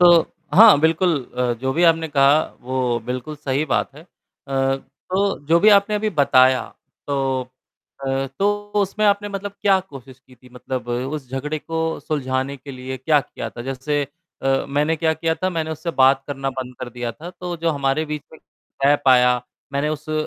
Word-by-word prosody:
तो 175 -1 +7 0.3
हाँ, 215 -5 +8
बिल्कुल 160 -1 +2
अ, 125 -1 +1
जो 130 0 -1
भी 170 - +2
आपने 165 -1 +4
कहा 145 +1 +4 0.2
वो 125 -1 -1
बिल्कुल 125 +5 -4
सही 145 -1 -1
बात 140 - -1
है। 150 - -12
अ, - - -25 1.0
तो 195 +1 0
जो 165 +3 +4
भी 215 - +6
आपने 205 +1 +4
अभी 215 +1 0
बताया 130 -5 +4 0.5
तो 135 -2 0 0.6
अ, 135 0 0
तो 205 +1 0
उसमें 205 +2 0
आपने 205 0 +2
मतलब 200 0 -5
क्या 195 -2 +4
कोशिश 135 -8 -12
की 130 -1 -21
थी 125 +1 -19
मतलब 125 -1 -5
उस 130 +3 -3
झगड़े 145 +4 -3
को 160 0 -3
सुलझाने 135 -2 -2
के 140 +2 -10
लिए 130 0 -6
क्या 150 +3 +3
किया - - -7
था? 120 - -8
जैसे 135 +3 -2 0.4
अ, 135 0 +1
मैंने 150 +3 +1
क्या 160 0 +1
किया 160 +1 -1
था, 185 - -1
मैंने 160 -3 -3
उससे 160 +2 -4
बात 135 +1 +5
करना 135 -1 -3
बंद 130 -1 -6
कर 125 - -5
दिया 120 0 -4
था। 160 +9 -10
तो 180 -1 -6
जो 165 +1 0
हमारे 140 +1 0
बीच 150 -1 -5
में 160 - -13 0.4
गैप 145 0 +3
आया, 125 -1 +5 0.3
मैंने 140 +2 0
उस 155 0 -5
अ, - - -1
145 Hz, 190 wpm, -21 LUFS, 130-165 Hz, 1.0 s, हाँ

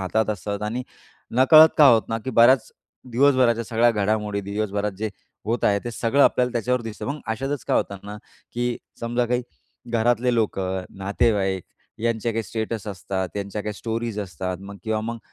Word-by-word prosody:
हातात 110 +4 0
असतात 105 +1 -4
आणि 115 +4 -2 0.5
नकळत 155 +4 +8
का 150 - +9
होतं 115 -3 +5
ना, 115 - 0
की 130 +4 -5
बऱ्याच 120 +1 +5 0.4
दिवसभराच्या 125 -3 +3
सगळ्या 115 +1 +3
घडामोडी 105 -1 0
दिवसभरात 100 0 -2
जे 110 -1 -2 0.3
होत 115 +2 -1
आहे, 100 0 +3
ते 120 - -3
सगळं 120 +5 +2
आपल्याला 125 0 +2
त्याच्यावर 125 +2 0
दिसतं. 110 -2 -6
मग 145 +2 -4
अशातच 135 +5 -3
काय - - +1
होतं 100 - -1
ना, 105 +1 -7 0.4
की 120 0 -1 0.2
समजा 120 +1 0
काही 125 +1 0 0.5
घरातले 120 +1 +2
लोकं, 95 -4 -1
नातेवाईक 95 -2 0 0.4
यांचे 115 0 0
काही 115 0 -1
स्टेटस 110 -1 -4
असतात 95 -1 -3
त्यांच्या 100 +1 -4
काही 105 - -3
स्टोरीज 115 -1 -3
असतात 90 -1 -4
मग 100 +1 -9
किंवा 110 -1 0
मग 115 +1 -4
110 Hz, 170 wpm, -23 LUFS, 100-120 Hz, 0.5 s, का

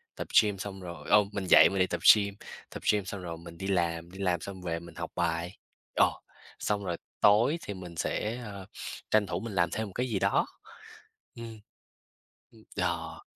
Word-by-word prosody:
tập - - -5 0.2
gym 105 -2 -1
xong 95 0 -6
rồi 85 -1 -8
ồ, 105 0 +7
mình 100 -2 -3
dậy - - +8
mình 95 - -2
đi 95 - +4
tập - - -3
gym, 100 -1 -2 0.3
tập - - -8
gym 100 -3 0
xong 95 0 -5
rồi 85 -2 -5
mình 85 0 -11
đi 95 - -5
làm, 85 -2 0
đi 95 - -11
làm 90 -4 +1
xong 95 -2 -7
về 85 -2 -2
mình 85 -1 -12
học 85 -2 -5
bài, 85 +2 -1 0.4
ờ, - - +5 0.5
xong 105 -1 -1
rồi 85 -1 -2 0.2
tối 115 +10 +5
thì 100 - -4
mình 90 -3 -9
sẽ, 110 +8 -1
ơ, 100 -2 -8 0.5
tranh 105 -2 +4
thủ 90 0 -2
mình 110 0 -6
làm 85 -1 +3
thêm 110 -1 -2
một 95 - -11
cái 125 +1 -1
gì 100 -4 0
đó. - - +2 0.9
Ừm. 115 -2 -8 0.9
Ừm, - - -18
đò. - - -2
95 Hz, 200 wpm, -29 LUFS, 85-105 Hz, 0.9 s, dậy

